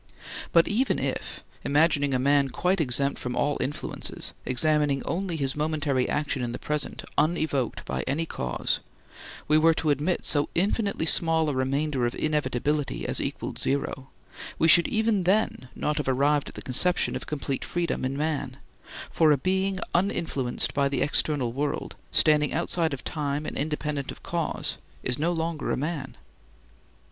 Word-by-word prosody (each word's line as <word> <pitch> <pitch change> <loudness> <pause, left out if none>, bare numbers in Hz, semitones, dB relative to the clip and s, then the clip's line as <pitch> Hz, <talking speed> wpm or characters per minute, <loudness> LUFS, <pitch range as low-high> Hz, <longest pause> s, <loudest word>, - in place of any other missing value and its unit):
But 170 -1 +5
even 245 +6 +1
if—imagining 145 -2 0
a - - +3
man 140 +1 +3
quite 180 +5 +1
exempt 140 0 +1
from 125 -1 -4
all 145 0 0
influences, 145 - -4
examining 145 +2 +2
only 180 0 -2
his 135 -3 -1
momentary 150 -4 0
action 145 -3 -1
in 120 -1 -3
the - - -3
present, 150 -1 -2 0.2
unevoked 155 -6 0
by 65 - -2
any 155 +5 0
cause—we 65 - -3
were 165 +1 +5
to 155 -2 +1
admit 150 +6 0
so 145 -1 +4
infinitely 200 0 0
small 160 -1 +4
a - - -1
remainder 135 0 0
of 120 - -4
inevitability 150 -1 -1
as - - +1
equaled - - -4
zero, 135 -1 -1 0.5
we 160 - +3
should 170 +1 +7
even 220 -2 +1
then 185 - +1
not 150 - -1
have 150 - -2
arrived 140 +2 +2
at - - -14
the - - -8
conception 180 +8 +1
of - - -5
complete 140 -2 -3
freedom 175 -5 -2
in 130 +1 -2
man, 150 -1 -2 0.5
for 160 -2 +4
a 145 - +4
being 190 +5 0
uninfluenced 165 -9 0
by 140 -1 +2
the 140 -2 0
external 145 -4 +1
world, 145 +2 -3 0.2
standing 150 -2 +4
outside 165 -2 0
of 130 - -13
time 150 -1 -2
and - - -5
independent 150 -1 -2
of - - -13
cause, - - -2 0.3
is 125 +2 -1
no 165 +3 +1
longer 165 -2 -2
a - - 0
man. 145 -1 -4
150 Hz, 155 wpm, -26 LUFS, 135-165 Hz, 0.5 s, should